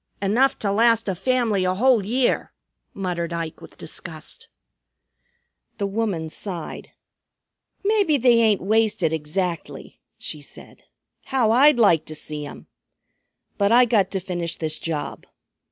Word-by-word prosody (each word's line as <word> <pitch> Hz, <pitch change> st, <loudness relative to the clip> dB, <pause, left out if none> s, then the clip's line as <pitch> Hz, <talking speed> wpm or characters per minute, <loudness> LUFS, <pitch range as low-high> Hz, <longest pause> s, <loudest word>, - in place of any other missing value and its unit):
"Enough 235 Hz, +8 st, +2 dB
to 200 Hz, -, -1 dB
last 230 Hz, +1 st, +3 dB
a 190 Hz, -, 0 dB
family 225 Hz, 0 st, +1 dB
a 185 Hz, 0 st, +1 dB
whole 240 Hz, 0 st, +3 dB
year," 245 Hz, +5 st, 0 dB, 0.4 s
muttered 175 Hz, -3 st, -3 dB
Ike 165 Hz, -1 st, -5 dB
with -, -, -14 dB
disgust. -, -, -8 dB, 1.3 s
The 200 Hz, -, -1 dB
woman 200 Hz, -5 st, -2 dB
sighed. 175 Hz, -4 st, -6 dB, 1.0 s
"Maybe 405 Hz, -8 st, +3 dB
they 245 Hz, -2 st, +4 dB
ain't 215 Hz, -3 st, +3 dB
wasted 205 Hz, -5 st, +1 dB
exactly," 165 Hz, +3 st, -4 dB, 0.2 s
she 150 Hz, -, -7 dB
said. 145 Hz, -, -13 dB, 0.4 s
"How 250 Hz, -5 st, +2 dB
I'd 270 Hz, +4 st, +6 dB
like 195 Hz, -9 st, +4 dB
to 155 Hz, -, -8 dB
see 150 Hz, -1 st, -6 dB
'em! -, -, -11 dB, 0.9 s
But 200 Hz, +1 st, +3 dB
I 245 Hz, +2 st, +7 dB
got 210 Hz, -5 st, +2 dB
to 195 Hz, -, -2 dB
finish 175 Hz, -2 st, -4 dB
this 155 Hz, -1 st, -3 dB
job. 160 Hz, -3 st, -4 dB
200 Hz, 135 wpm, -23 LUFS, 170-235 Hz, 1.3 s, I